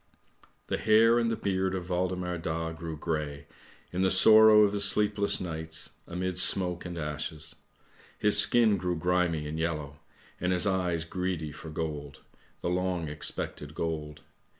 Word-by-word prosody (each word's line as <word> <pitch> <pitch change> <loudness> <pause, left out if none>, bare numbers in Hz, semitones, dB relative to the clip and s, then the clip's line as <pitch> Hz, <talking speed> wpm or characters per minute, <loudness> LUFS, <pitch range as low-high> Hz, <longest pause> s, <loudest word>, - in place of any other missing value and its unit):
" - - -31
The - - -1
hair 115 +2 +5
and 115 -1 +1
the 115 - 0
beard 95 -2 -1
of 90 -1 -6
Waldemar 90 -1 -2
Daa 80 0 -3
grew 80 -1 -7
grey, 75 -3 -4 0.5
in 90 - -1
the 95 - +3
sorrow 110 +2 +7
of 100 -1 +2
his 100 -1 0
sleepless 100 0 +2
nights, 80 -2 -5 0.2
amid 90 +1 -2
smoke 90 -2 +1
and 90 -1 -7
ashes. 75 0 -3 0.6
His 105 -1 +3
skin 110 -1 +4
grew 90 0 -2
grimy 85 -2 0
and 80 +2 -5
yellow, 75 -3 -3 0.4
and 90 +1 0
his 90 +3 +3
eyes 90 -4 0
greedy 90 -3 -3
for 80 +3 -10
gold, 75 -3 -5 0.4
the - - -2
long 90 -2 -1
expected 75 0 -4
gold. 75 -2 -4
90 Hz, 155 wpm, -28 LUFS, 80-95 Hz, 0.6 s, sorrow